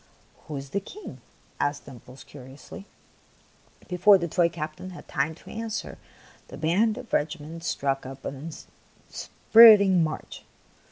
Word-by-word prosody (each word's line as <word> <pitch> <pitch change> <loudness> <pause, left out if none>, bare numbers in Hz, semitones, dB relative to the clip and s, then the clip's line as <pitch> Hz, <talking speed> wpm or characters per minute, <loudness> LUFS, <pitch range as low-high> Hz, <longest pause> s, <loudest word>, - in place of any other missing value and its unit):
" - - -31
Who 150 - -6
is 135 0 -7
the 200 - 0
King? 395 - -11 0.2
" - - -34
asked 145 0 -2
Dimples, 125 +1 -13
curi 130 -2 -13
ously. 190 +7 -12 1.0
Before 185 +3 +5
the 170 -2 -3
toy 170 +1 +2
captain 155 +2 -7
had 180 - -12
time 150 +3 -2
to - - -16
answer, 225 0 -5 0.5
the - - -10
band 205 +8 +1
of 255 -2 -10
the - - +2
regiment 160 +2 -7
struck 135 -5 -2
up 135 +1 -10
an 140 +4 -6 0.6
inspirit 225 -2 +7
ing 190 -4 +3
march. 155 -1 -6
165 Hz, 160 wpm, -26 LUFS, 145-200 Hz, 1.0 s, inspirit